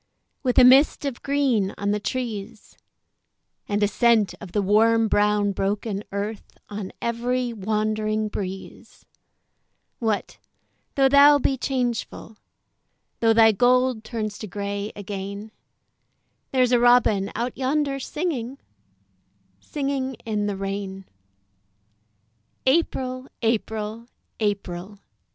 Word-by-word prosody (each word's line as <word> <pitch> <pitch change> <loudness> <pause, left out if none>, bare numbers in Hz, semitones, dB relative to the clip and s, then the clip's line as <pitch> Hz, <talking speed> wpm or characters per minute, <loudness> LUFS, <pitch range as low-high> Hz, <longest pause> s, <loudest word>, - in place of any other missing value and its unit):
With 250 -3 0
a - - +8
mist 270 +4 +6
of 270 -4 -4
green 265 -9 +1
on 200 0 -1
the 210 - 0
trees 225 -2 -5 0.9
And 205 0 +1
a - - +4
scent 220 0 +3
of 195 -4 -9
the 205 - +1
warm 225 +3 +4
brown 205 -1 +2
broken 200 +1 -2
earth 205 +2 -5
On 205 -2 -6
every 240 +1 -1
wandering 215 +1 -1
breeze; 195 -2 -7 0.9
What, 220 -3 -2 0.6
though 270 -1 +5
thou 285 +2 +7
be 270 -1 +1
changeful, 245 -4 -3 0.8
Though 225 -1 +4
thy 225 0 +6
gold 250 +1 +2
turns 215 -3 -4
to 215 - -6
grey 200 +1 -4
again, 200 +1 -6 1.0
There's 255 -2 +2
a 245 - +4
robin 240 -5 +4
out 240 +1 -2
yonder 275 +1 0
singing, 275 -4 -3 1.0
Singing 275 - -3
in 210 -2 -1
the 200 -1 -3
rain. 195 0 -5 1.6
April! 260 -3 0 0.2
April! 220 0 -2 0.3
April! 200 -2 -3
220 Hz, 110 wpm, -24 LUFS, 205-255 Hz, 1.6 s, a